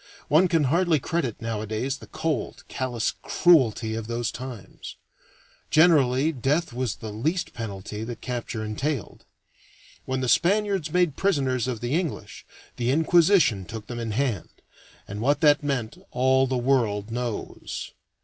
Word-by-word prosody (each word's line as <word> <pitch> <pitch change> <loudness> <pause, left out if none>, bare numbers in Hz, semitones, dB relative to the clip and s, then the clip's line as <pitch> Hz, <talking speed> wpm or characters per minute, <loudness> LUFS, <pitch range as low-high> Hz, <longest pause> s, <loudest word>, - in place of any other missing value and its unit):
One 165 +5 +5
can 165 -3 +2
hardly 165 +3 +2
credit 145 -6 -2
nowadays 115 +4 -3
the - - -12
cold, 155 -8 -3
callous 120 -3 -2
cruelty 120 - +3
of 110 -1 -4
those 120 0 -2
times. 125 -6 -8 0.7
Generally 150 -3 +4
death 140 +2 0
was 125 -2 -2
the 110 -2 -7
least 160 - -1
penalty 105 -1 -6
that 120 -1 -6
capture 120 -3 -4
entailed. 130 +3 -3 0.8
When 130 0 -2
the 130 - -1
Spaniards 195 - +2
made 175 -5 +2
prisoners 135 - +1
of 120 -4 -3
the 120 +2 -2
English, 170 -1 -3 0.3
the 120 0 0
Inquisition 160 - +4
took 110 +3 -8
them 120 +1 -6
in 115 -1 -3
hand, 115 -2 -1 0.6
and 100 +2 -6
what 140 +4 +2
that 150 -1 +5
meant 135 -6 -2
all 130 +1 +3
the 130 0 0
world 115 -5 +1
knows. 120 -2 -4
130 Hz, 140 wpm, -25 LUFS, 115-155 Hz, 0.8 s, One